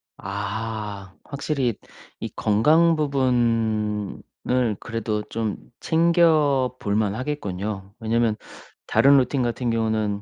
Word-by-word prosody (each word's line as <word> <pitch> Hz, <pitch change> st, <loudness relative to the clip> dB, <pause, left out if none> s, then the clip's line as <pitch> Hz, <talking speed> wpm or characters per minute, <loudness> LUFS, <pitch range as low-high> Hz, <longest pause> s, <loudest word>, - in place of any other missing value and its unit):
아. 100 Hz, 0 st, -5 dB, 0.2 s
확실히 140 Hz, -3 st, -1 dB, 0.5 s
이 -, -, -3 dB
건강 155 Hz, +11 st, +4 dB
부분을 115 Hz, -4 st, 0 dB
그래도 110 Hz, -2 st, -3 dB
좀 110 Hz, -2 st, -3 dB, 0.2 s
챙겨 160 Hz, -6 st, +3 dB
볼 100 Hz, 0 st, -1 dB
만하겠군요. 105 Hz, -3 st, -3 dB
왜냐면 115 Hz, -1 st, +1 dB, 0.5 s
다른 140 Hz, +1 st, +5 dB
루틴 130 Hz, 0 st, +1 dB
같은 120 Hz, +1 st, -1 dB
경우는 110 Hz, -3 st, 0 dB
115 Hz, 200 characters per minute, -23 LUFS, 105-135 Hz, 0.5 s, 다른